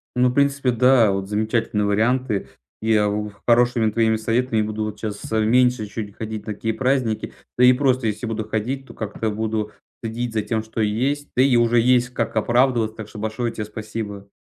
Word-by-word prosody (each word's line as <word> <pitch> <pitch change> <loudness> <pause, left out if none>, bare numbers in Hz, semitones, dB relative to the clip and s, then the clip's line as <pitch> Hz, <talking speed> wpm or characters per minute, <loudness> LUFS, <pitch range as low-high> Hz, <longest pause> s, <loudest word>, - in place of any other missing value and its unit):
Ну, 125 0 +4
в - - -3
принципе, 140 -1 +2
да. 120 -2 +4
Вот 95 0 -3
замечательные 110 0 0
варианты. 110 - 0 0.3
Я 110 -2 +2
у 105 0 -3 0.2
хорошими 120 -1 +3
твоими 110 0 +2
советами 115 +1 0
буду 110 0 -2
вот 105 -1 -6
щас, 105 -1 -6
а, 110 - +2
меньше 125 +1 +3
чуть 105 -1 -7
ходить 110 -1 -5
на 105 - -2
такие 110 +2 -2
праздники, 125 -3 0 0.3
да 125 - +4
и 125 0 +8
просто 130 -2 +1
если 105 +3 -3
буду 110 -1 -3
ходить, 130 +5 -3
то - - -13
как-то 110 +1 -3
буду 110 0 -2 0.3
следить 115 +1 -3
за 110 - +1
тем, 110 +1 -2
что 110 0 -4
есть. 130 +8 -1
Да 125 - +5
и 135 -2 +4
уже 120 0 +3
есть 125 +1 +3
как 115 -3 -3
оправдываться. 120 0 +2
Так 110 -2 -7
что 105 - -10
большое 110 +2 -2
те 110 - -5
спасибо. 105 -2 -7
110 Hz, 195 wpm, -22 LUFS, 105-125 Hz, 0.3 s, и